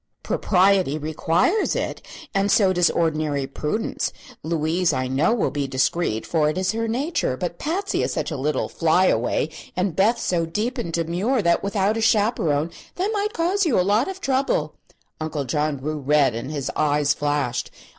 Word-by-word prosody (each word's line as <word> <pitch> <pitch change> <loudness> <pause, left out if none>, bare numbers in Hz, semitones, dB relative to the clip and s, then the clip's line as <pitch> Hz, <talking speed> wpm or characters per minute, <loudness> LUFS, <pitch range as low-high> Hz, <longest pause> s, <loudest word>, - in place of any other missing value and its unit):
"Propriety 185 -5 +2
requires 160 - +1
it; - - -3 0.3
and 195 +1 +1
so 195 -3 +4
does 175 -1 +3
ordinary 155 -4 0
prudence. 150 +10 -2 0.3
Louise, 165 +1 0
I 130 -1 -1
know, 135 +9 +2
will 235 -3 +1
be 145 -1 -2
discreet, 130 -2 0
for 155 -3 +1
it 155 - -3
is 185 0 +1
her 225 +1 -2
nature; 250 - -1
but 175 +1 -4
Patsy 375 +6 -1
is - - -1
such - - -2
a - - -2
little 145 +1 -1
flyaway 160 -6 +2 0.3
and 185 -2 -1
Beth 220 +5 +3
so 170 -2 0
deep 230 +9 -2
and 170 -8 -3
demure, 180 +9 0
that 170 0 +3
without 200 +1 0
a - - -1
chaperone 200 -9 +2 0.2
they 375 +3 -1
might 420 0 -1
cause 365 +5 +1
you 300 - +2
a - - +3
lot 210 +6 +2
of 380 0 -5
trouble." 260 - 0 0.5
Uncle 155 -3 -3
John 150 +3 -1
grew 150 +3 -4
red 145 -2 +3
and 115 +4 -5
his 145 -3 -3
eyes 150 -1 +2
flashed. 145 -5 -1
170 Hz, 175 wpm, -23 LUFS, 150-215 Hz, 0.5 s, so